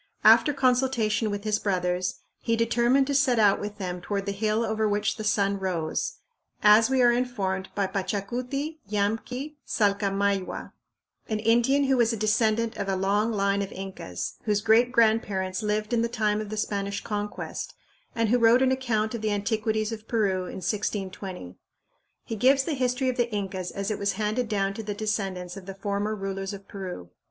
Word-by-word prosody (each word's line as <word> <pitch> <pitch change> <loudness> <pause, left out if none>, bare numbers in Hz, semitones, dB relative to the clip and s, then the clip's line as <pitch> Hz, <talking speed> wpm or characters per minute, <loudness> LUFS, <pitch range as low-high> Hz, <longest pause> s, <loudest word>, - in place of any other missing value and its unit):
After 295 - +7
consultation 250 -5 +1
with 205 0 -4
his 215 -1 +1
brothers, 180 -2 -1 0.2
he 230 - 0
determined 235 +3 +3
to 285 - -2
set 265 -3 +3
out 205 -3 +4
with 205 0 -5
them 180 -3 -4
"toward 200 +2 -3
the 200 - -1
hill 215 +3 0
over 220 -1 0
which 205 0 0
the 215 - -6
sun 200 -1 +1
rose," 185 - -2 0.5
as 215 +3 +7
we 260 -1 +3
are 240 - +6
informed 200 -6 -1
by 200 - +1
Pachacuti 240 - -3
Yamqui 225 +8 -2
Salcamayhua, 200 -2 0 0.6
an 215 - 0
Indian 240 +6 +3
who 270 -1 +2
was 235 -1 +3
a 225 - -2
descendant 220 +2 +1
of 200 -1 -3
a 195 - +1
long 205 +4 +1
line 200 -1 +1
of 195 - -4
Incas, 185 - -6
whose 210 -2 +1
great 230 +3 +4
grandparents 215 -5 +2
lived 210 +1 -1
in 235 - +3
the 235 - 0
time 215 -3 0
of 215 - -6
the 215 - -5
Spanish 200 -1 -2
Conquest, 210 -1 -4 0.4
and 230 -2 +1
who 245 +2 +3
wrote 235 +3 +5
an 260 - +3
account 235 -4 0
of 230 - -4
the 215 - 0
antiquities 215 +1 0
of 220 -1 -7
Peru 195 -5 +1
in 185 - -7
1620. 190 - -4 0.7
He 225 - -4
gives 265 +5 +4
the 315 - -2
history 255 -1 0
of 255 - -2
the 240 -1 +1
Incas 190 -3 -3
as 200 +1 -3
it 215 - -3
was 200 0 0
handed 220 +2 -1
down 195 -2 0
to 225 - -5
the 205 -1 -4
descendants 195 -4 -3
of 195 -1 -10
the 195 - -6
former 205 +2 -2
rulers 195 0 -4
of 200 0 -10
Peru. 180 - -7
210 Hz, 185 wpm, -26 LUFS, 195-235 Hz, 0.7 s, After